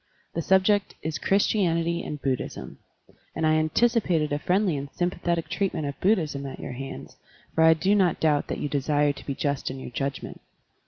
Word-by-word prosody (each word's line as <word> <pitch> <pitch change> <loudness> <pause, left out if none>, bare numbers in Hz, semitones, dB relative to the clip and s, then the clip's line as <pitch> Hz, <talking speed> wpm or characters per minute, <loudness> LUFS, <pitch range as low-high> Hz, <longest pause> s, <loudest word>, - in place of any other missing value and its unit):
The 165 - -1
subject 190 +3 +2
is 155 -4 -3
"Christianity 170 -4 +1
and 150 - -5
Buddhism," 135 -2 -4 0.6
and 160 - 0
I 155 - +4
anticipated 165 -2 +2
a 145 - 0
friendly 180 +1 +1
and 140 0 -5
sympathetic 175 -1 -1
treatment 180 -6 -1
of 140 -1 -5
Bud 210 +4 +4
dhism 140 -5 -4
at - - -10
your 140 - -6
hands, 135 +2 -8 0.4
for 160 - +3
I 160 0 +7
do 185 +6 +2
not 190 -5 +3
doubt 150 -2 +2
that - - -3
you - - -2
desire 145 +1 +1
to - - -12
be 140 - -2
just 140 -1 -1
in 130 +1 -6
your 130 - -8
judgment. 135 +2 -4
160 Hz, 190 wpm, -26 LUFS, 145-185 Hz, 0.6 s, I